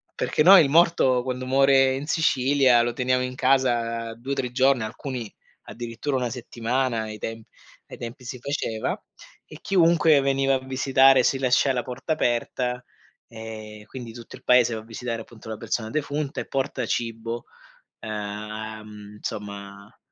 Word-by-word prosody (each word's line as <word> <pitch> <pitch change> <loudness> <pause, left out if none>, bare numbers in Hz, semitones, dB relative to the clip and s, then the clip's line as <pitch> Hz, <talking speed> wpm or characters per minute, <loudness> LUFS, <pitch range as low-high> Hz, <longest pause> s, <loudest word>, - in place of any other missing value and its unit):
perché 150 - +1
noi 185 -1 +9
il 140 - 0
morto, 155 -6 +4
quando 130 0 -4
muore 135 0 +4
in 140 +2 -5
Sicilia, 135 -5 +3
lo 120 0 -1
teniamo 130 +1 +1
in 125 0 -4
casa 120 -3 +1
2-3 125 0 -3
giorni, 130 -2 +3
alcuni 120 0 -6 0.3
addirittura 120 +4 -5
1 125 -1 -1
settimana; 120 0 -2
ai 110 -1 -7
temp 115 +1 -6 0.4
ai - - -10
tempi 120 +2 -8
si 125 0 -6
faceva 120 -5 -3 0.5
e - - -12
chiunque 165 -5 +4
veniva 135 0 +2
a - - -1
visitare. 135 0 +4
Si 135 - +2
lascia 130 +1 +3
la 125 - -1
porta 130 +5 -3
aperta 125 -2 -1 0.4
e 110 -2 -9
quindi 120 -3 -8
tutto 115 -1 -11
il - - -22
paese 125 -2 +5
va 110 - -5
a - - -16
visitare, 115 0 -5
appunto, 110 -1 -13
la 110 - -5
persona 110 0 -3
defunta 145 0 -3
e - - -9
porta 135 -2 -2
cibo, 115 0 -3 0.6
uhm, 105 0 -7
insomma 100 -1 -8
125 Hz, 150 wpm, -24 LUFS, 115-135 Hz, 0.6 s, noi